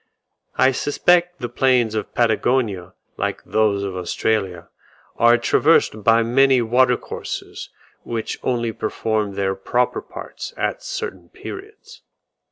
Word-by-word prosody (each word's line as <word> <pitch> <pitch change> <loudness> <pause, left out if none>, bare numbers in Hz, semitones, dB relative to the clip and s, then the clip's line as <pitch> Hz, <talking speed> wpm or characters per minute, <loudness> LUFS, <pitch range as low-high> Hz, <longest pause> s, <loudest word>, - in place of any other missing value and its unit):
I 130 +1 +5
suspect 175 +5 +1
the 120 - -2
plains 120 -2 +2
of 110 -2 -4
Patagonia 115 -5 0 0.2
like - - -3
those 105 -2 +1
of 95 -2 -4
Australia, 90 -1 -2 0.5
are 120 +1 +5
traversed 120 -3 +2
by 115 +2 +4
many 130 +3 +4
water 125 +1 +3
courses - - -7 0.3
which 115 -2 -4
only 120 -2 -1
perform 110 -1 -2
their 95 -1 0
proper 120 +6 -1
parts - - -9
at - - -2
certain - - -6
periods. 410 +2 -11
120 Hz, 120 wpm, -21 LUFS, 105-130 Hz, 0.5 s, I